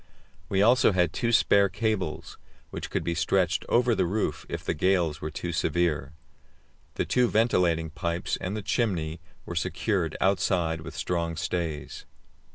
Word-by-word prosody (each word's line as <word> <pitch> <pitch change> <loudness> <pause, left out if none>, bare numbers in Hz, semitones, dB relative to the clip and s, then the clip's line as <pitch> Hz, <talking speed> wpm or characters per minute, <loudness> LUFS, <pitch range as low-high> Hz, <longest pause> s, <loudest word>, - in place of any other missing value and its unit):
We 95 0 +2
also 120 -1 +5
had 90 -3 +2
two 120 - 0
spare 100 -3 +4
cables, 105 -4 -3 0.3
which - - -5
could - - -2
be 85 - -1
stretched 90 +2 +1
over 120 0 +3
the 100 - +1
roof 105 +4 -2
if - - -4
the - - -1
gales 85 -2 +1
were 75 - -3
too 85 +3 -4
severe. 80 -4 0 0.8
The - - -1
two 125 -1 +2
ventilating 90 -9 +2
pipes 85 +3 -2
and 95 +4 -3
the 105 - -5
chimney 90 -8 -1 0.2
were - - -6
secured 90 -1 -1
outside 90 -4 +1
with - - -9
strong 85 -2 -1
stays. 85 -3 -4
90 Hz, 155 wpm, -27 LUFS, 80-100 Hz, 0.8 s, also